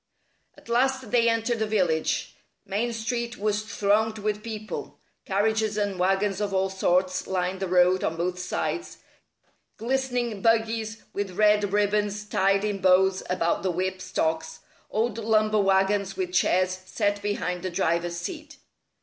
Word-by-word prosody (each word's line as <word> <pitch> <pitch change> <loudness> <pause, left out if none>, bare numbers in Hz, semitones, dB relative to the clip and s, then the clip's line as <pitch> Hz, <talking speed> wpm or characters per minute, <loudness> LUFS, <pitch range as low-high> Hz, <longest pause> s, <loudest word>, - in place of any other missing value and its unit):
At - - -18
last 255 0 +1
they 235 -1 +4
entered 230 +1 0
the 220 - 0
village. 180 -7 0 0.3
Main 210 +4 -1
Street 235 +1 -3
was 210 0 0
thronged 215 +1 +1
with 210 0 -2
people. 215 -1 -6 0.3
Carriages 215 +2 0
and 200 -3 -1
wagons 195 +2 +1
of 200 -2 -1
all 190 0 +1
sorts 185 -1 +1
lined 185 0 -1
the 190 - -2
road 180 +1 +3
on 160 - -1
both 180 +1 -2
sides 260 - -3 0.8
glistening 245 -2 -1
buggies 225 0 +1
with 195 -3 -4
red 210 -2 +4
ribbons 210 0 +1
tied 195 0 +2
in 205 -2 -2
bows 190 0 +4
about 170 -2 0
the 190 - 0
whip 185 +1 -2
stocks, 160 -3 -2 0.3
old 225 0 -1
lumber 215 -1 +2
wagons 195 0 +1
with 180 -1 -3
chairs 185 0 +2
set 205 -1 -1
behind 200 -3 -2
the 185 - -3
driver's 170 -1 0
seat. 305 - -7
205 Hz, 145 wpm, -26 LUFS, 185-220 Hz, 0.8 s, they